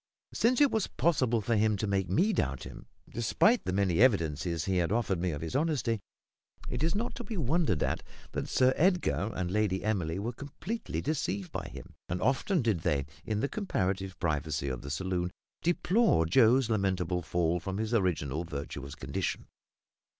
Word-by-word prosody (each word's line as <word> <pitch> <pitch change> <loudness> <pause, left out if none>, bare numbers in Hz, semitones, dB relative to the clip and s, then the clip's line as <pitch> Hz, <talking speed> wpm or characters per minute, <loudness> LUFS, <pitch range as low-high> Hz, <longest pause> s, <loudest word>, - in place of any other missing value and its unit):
Since 245 +4 +2
it 285 - +6
was 220 -3 +1
possible 130 -9 +1
for 115 +2 0
him 110 0 +2
to 105 - -1
make 100 -2 0
me 205 +6 +3
doubt 70 - -1
him, - - -10 0.2
despite 210 - +2
the - - 0
many 95 -2 +1
evidences 85 - +2
he 95 -1 +1
had 85 0 +1
afforded 105 -6 0
me 90 - +1
of 75 -3 -4
his 80 +6 -4
honesty, 135 -7 +1 0.7
it 125 - -3
is 160 +3 +1
not 230 +4 -1
to 250 - -6
be 225 -3 -5
wondered 155 - +1
at - - -1 0.3
that - - -3
Sir 130 0 +4
Edgar 155 - +2
and 90 -1 -2
Lady 105 -2 +1
Emily 95 -6 0
were 110 +5 -3
completely 160 - -5
deceived 115 - -2
by - - -4
him; - - -10 0.2
and 90 - -1
often 140 +5 +1
did 110 -7 +1
they, 70 -3 0 0.2
in 110 -2 -1
the 140 - +1
comparative 95 - -2
privacy 75 -4 -1
of 65 -2 -4
the 70 - -7
saloon, 90 +3 -1 0.3
deplore 175 - +3
Joe's 120 +7 +5
lamentable 95 -5 0
fall 85 +1 0
from 95 +3 -4
his 110 +2 -2
original 85 - 0
virtuous 70 -3 -6
condition. - - -3
100 Hz, 180 wpm, -30 LUFS, 85-135 Hz, 0.7 s, it